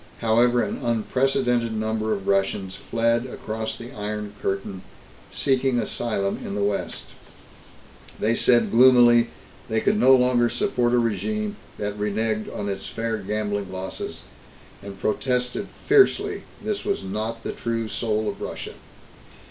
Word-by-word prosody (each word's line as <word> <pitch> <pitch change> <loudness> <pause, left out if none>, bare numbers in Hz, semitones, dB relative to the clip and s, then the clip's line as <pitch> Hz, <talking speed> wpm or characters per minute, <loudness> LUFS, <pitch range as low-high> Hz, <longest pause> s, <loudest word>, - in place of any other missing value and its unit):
However, 120 +2 +3
an - - -3
unprecedented 120 0 +1
number 110 0 -1
of 100 -2 -3
Russians 95 -1 0
fled 115 +1 0
across 110 -2 -5
the 120 +2 -9
Iron 105 -2 -5
Curtain, 95 -1 -3 0.5
seeking 130 -2 +1
asylum 105 -5 -1
in 100 - -5
the 100 - 0
West. 100 0 -2 1.2
They 110 +2 +2
said 120 0 +4
gloomily 120 -1 +6 0.4
they 110 0 +2
could 205 - +1
no 130 -6 +7
longer 125 -1 +3
support 120 0 +1
a - - +4
regime 205 - -1 0.2
that 105 0 -4
reneged 110 +1 0
on 100 - -4
its 100 -1 -4
fair 115 -1 -2
gambling 100 -1 -2
losses, 95 -3 -5 0.6
and 100 -1 -9
protested 125 - -1 0.2
fiercely 410 -1 +3 0.2
this 210 -1 -2
was 200 - -1
not 110 +4 -4
the - - -3
true 115 -1 -3
soul 110 -1 -1
of - - -4
Russia. - - -5
115 Hz, 135 wpm, -24 LUFS, 105-125 Hz, 1.2 s, no